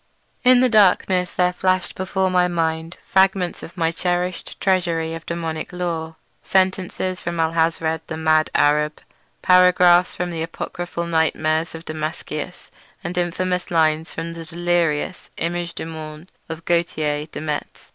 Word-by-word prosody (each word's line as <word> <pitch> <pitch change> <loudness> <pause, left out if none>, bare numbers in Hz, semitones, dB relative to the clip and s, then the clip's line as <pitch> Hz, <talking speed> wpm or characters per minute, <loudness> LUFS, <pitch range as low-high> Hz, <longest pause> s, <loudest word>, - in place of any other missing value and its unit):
In 250 -1 +6
the 255 - +5
darkness 185 -4 +3
there 180 0 +2
flashed 185 +1 0
before 190 0 -1
my 180 -1 +3
mind 165 -1 -2
fragments 190 -1 +2
of 175 - -11
my 165 -1 +1
cherished 180 +1 -2
treasury 170 -4 +1
of 165 0 -8
daemoniac 165 -2 -4
lore; 165 -3 -3 0.3
sentences 185 -1 0
from 170 0 -4
Alhazred 160 0 +1
the 160 - -5
mad 155 -1 +3
Arab, 150 +1 +2 0.4
paragraphs 180 -1 +5
from 180 0 -3
the 165 -1 -3
apocryphal 170 +1 -4
nightmares 160 0 0
of 165 +1 -9
Damascius, 155 +1 -5 0.3
and 175 +1 -4
infamous 180 +1 -1
lines 160 -1 +2
from 165 +1 -5
the 165 0 -7
delirious 170 0 -1
Image 170 0 -3
du - - -5
Monde 155 +1 -8 0.2
of 160 0 -7
Gauthier 155 -3 0
de - - -7
Metz. 150 -1 -5
170 Hz, 140 wpm, -21 LUFS, 160-180 Hz, 0.4 s, In